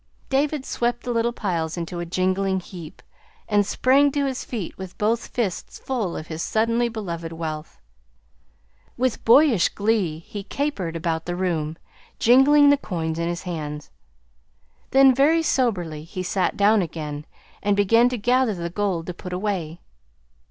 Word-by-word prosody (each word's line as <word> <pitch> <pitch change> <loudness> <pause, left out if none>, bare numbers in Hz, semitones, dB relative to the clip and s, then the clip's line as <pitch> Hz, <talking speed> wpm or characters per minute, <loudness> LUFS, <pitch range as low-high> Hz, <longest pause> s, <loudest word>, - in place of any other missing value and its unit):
David 280 +1 0
swept 240 0 -1
the 245 - -3
little 235 0 +1
piles 170 -8 -2
into 170 +1 -4
a 175 - -4
jingling 185 +2 0
heap, 175 -2 -11 0.4
and 205 -1 +3
sprang 270 +7 +3
to 285 -1 +1
his 265 -2 -3
feet 215 -9 -5
with 190 -1 -9
both 225 +3 0
fists 215 -7 -3
full 230 -10 -3
of 155 - -6
his 160 0 -6
suddenly 230 +4 +1
beloved 170 -7 -5
wealth. 160 -1 -6 1.2
With 255 -1 -1
boyish 235 - +5
glee 205 -7 0
he 205 +5 -8
capered 205 - -3
about 165 0 -2
the 175 - -2
room, 165 -4 -2 0.4
jingling 285 +4 +6
the 285 - +4
coins 165 - -3
in 170 - -1
his 175 0 -3
hands. 150 -4 -5 1.0
Then, 270 0 +6
very 305 +6 +3
soberly, 180 - 0
he 185 +3 -6
sat 185 0 -1
down 205 +1 +4
again, 150 -3 -5 0.3
and 205 0 +1
began 230 +4 +4
to 250 - -3
gather 245 0 +2
the 170 -1 -4
gold 185 -3 -1
to 180 - -5
put 180 +1 -8
away. 180 -4 -3
195 Hz, 155 wpm, -23 LUFS, 170-240 Hz, 1.2 s, jingling